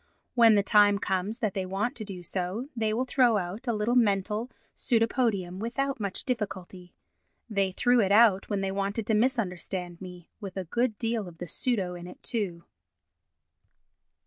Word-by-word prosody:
When 230 -3 +6
the 200 - +3
time 205 -1 +5
comes 195 +3 -1
that 215 -5 -1
they 195 -2 -2
want 195 +7 -2
to 220 - -5
do 190 -4 -7
so 190 +9 -3
they 220 -2 0
will 240 +4 0
throw 250 -3 +3
out 195 +7 -5
a - - +2
little 215 +2 0
mental 210 0 +1 0.3
pseudopodium 225 -6 +1
without 260 +4 -2
much 200 -3 -3
difficulty. 190 -7 -5 0.5
They 200 -4 0
threw 245 +6 +3
it 195 -1 +1
out 205 -2 +5
when 205 -2 -1
they 195 0 -1
wanted 200 +2 -2
to 220 - 0
misunderstand 190 -6 -1
me—with 185 +2 -10
a 190 - -2
good 235 +5 0
deal 225 -3 -2
of 170 -2 -12
the 175 - -6
pseudo 190 0 -1
in 175 0 -8
it, - - -13
too. 190 -8 -3
205 Hz, 170 wpm, -28 LUFS, 185-230 Hz, 0.5 s, When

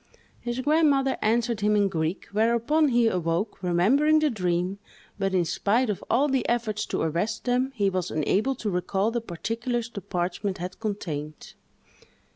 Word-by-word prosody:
His 240 +1 -4
grandmother 285 -2 +3
answered 230 0 +1
him 210 +1 +3
in 205 -1 +3
Greek, 165 -1 -2
whereupon 235 +9 +2
he 240 -3 +3
awoke, 180 +1 -1
remembering 225 - +3
the 305 -2 +2
dream, 180 -1 -1 0.4
but, 195 -1 0
in 175 -2 +2
spite 220 +7 +1
of 200 - -6
all 265 +6 +3
the 265 -3 +1
efforts 225 -3 -1
to - - -1
arrest 175 +8 -1
them, 250 +2 +1
he 205 -4 +1
was 185 -2 -1
unable 200 - 0
to 220 -5 -3
recall 190 +4 0
the 235 0 -2
particulars 230 +5 -3
the 200 - -6
parchment 185 +3 -2
had 180 +1 -6
contained. 155 -9 -5
210 Hz, 160 wpm, -26 LUFS, 180-240 Hz, 0.4 s, grandmother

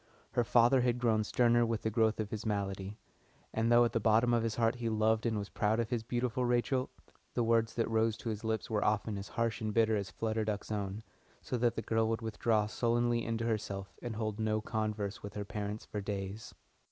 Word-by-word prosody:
Her 120 - +2
father 120 +3 +4
had 120 -1 +1
grown 115 -3 +2
sterner 120 +2 +3
with 115 -2 -1
the 110 - 0
growth 110 0 +2
of 105 -2 -3
his 110 -1 -4
malady, 100 -1 -3 0.6
and 115 +1 +1
though 120 0 +7
at 120 - -1
the 115 - +2
bottom 115 +2 +3
of 120 - +3
his 115 -1 -1
heart 115 -1 +2
he 115 -1 -2
loved 110 +1 +2
and 110 -2 0
was 100 -1 -4
proud 110 +2 +1
of 115 0 -1
his 120 -2 0
beautiful 120 +1 -1
Rachel, 125 +2 +1 0.5
the 120 - +2
words 115 0 +2
that 115 - +1
rose 110 -1 +1
to 115 - -5
his 110 0 -4
lips 110 -2 -1
were 105 -2 0
often 105 0 +1
as 100 +1 -5
harsh 115 +1 -1
and 110 -1 -1
bitter 110 0 +3
as 100 -2 -2
Flutter 110 +2 -1
Duck's 105 0 -3
own, 100 0 -3 0.4
so - - -3
that 120 0 +2
the 115 - -3
girl 110 0 +1
would 115 0 -2
withdraw 110 0 +1
sullenly 120 +2 +1
into 115 0 -2
herself 100 -3 -3
and 120 -2 -4
hold 110 -1 -3
no 110 0 +1
converse 105 -2 -3
with 100 0 -8
her 105 -1 -3
parents 105 +1 -4
for 105 - -4
days. 100 +1 -5
110 Hz, 225 wpm, -33 LUFS, 105-115 Hz, 0.6 s, though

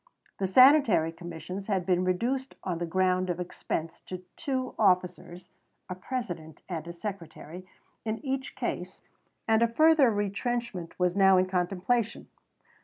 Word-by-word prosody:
The 195 - 0
Sanitary 255 - +6
Commissions 175 +3 -7
had 190 -4 0
been 180 -1 +2
reduced 245 +9 -1
on 175 -3 -2
the 175 - -2
ground 185 +1 +1
of 175 0 -2
expense 165 -2 -4
to 185 0 -6
two 260 -5 -3
officers 180 -3 0 0.4
(a - - -2
President 180 - -6
and 170 -3 -5
a - - -5
Secretary) 180 -1 -8 0.4
in 220 -1 -2
each 265 0 -3
case, - - -4 0.5
and 220 0 +4
a 235 - +5
further 310 +2 +5
retrenchment 205 -2 -3
was 180 0 +1
now 195 -1 +6
in 185 - +4
contemplation. 190 +5 -1
185 Hz, 140 wpm, -28 LUFS, 180-230 Hz, 0.5 s, Sanitary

